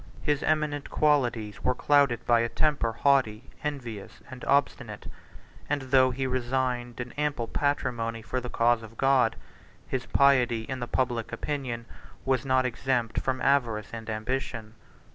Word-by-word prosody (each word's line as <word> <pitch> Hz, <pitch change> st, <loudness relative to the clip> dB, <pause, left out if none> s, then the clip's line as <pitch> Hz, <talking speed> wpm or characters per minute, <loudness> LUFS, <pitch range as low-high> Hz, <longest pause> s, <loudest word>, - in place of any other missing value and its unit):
His 145 Hz, -2 st, +1 dB
eminent 150 Hz, -2 st, 0 dB
qualities 120 Hz, -9 st, +1 dB
were 125 Hz, -, +2 dB
clouded 140 Hz, -5 st, +3 dB
by 120 Hz, -1 st, +4 dB
a 115 Hz, 0 st, 0 dB
temper 145 Hz, -6 st, +1 dB
haughty, 125 Hz, -2 st, +1 dB
envious, 125 Hz, -9 st, -5 dB
and 130 Hz, -1 st, -9 dB
obstinate; 140 Hz, +1 st, 0 dB, 0.6 s
and, 145 Hz, -2 st, 0 dB
though 130 Hz, 0 st, +4 dB
he 130 Hz, +1 st, -2 dB
resigned 125 Hz, -1 st, -1 dB
an 125 Hz, 0 st, -5 dB
ample 145 Hz, -6 st, -1 dB
patrimony 115 Hz, -6 st, -1 dB
for 130 Hz, +3 st, -3 dB
the 125 Hz, -, -6 dB
cause 120 Hz, 0 st, +2 dB
of 110 Hz, 0 st, -12 dB
God, 130 Hz, -4 st, +3 dB, 0.5 s
his 130 Hz, -2 st, -3 dB
piety, 125 Hz, -5 st, +3 dB
in 130 Hz, +3 st, -5 dB
the 120 Hz, -, -4 dB
public 120 Hz, -3 st, -1 dB
opinion, 130 Hz, -6 st, -3 dB, 0.4 s
was 130 Hz, 0 st, 0 dB
not 130 Hz, 0 st, +3 dB
exempt 125 Hz, -1 st, -1 dB
from 130 Hz, -1 st, -2 dB
avarice 120 Hz, -7 st, +1 dB
and 115 Hz, 0 st, -6 dB
ambition. 110 Hz, 0 st, -3 dB
125 Hz, 145 wpm, -27 LUFS, 115-135 Hz, 0.6 s, by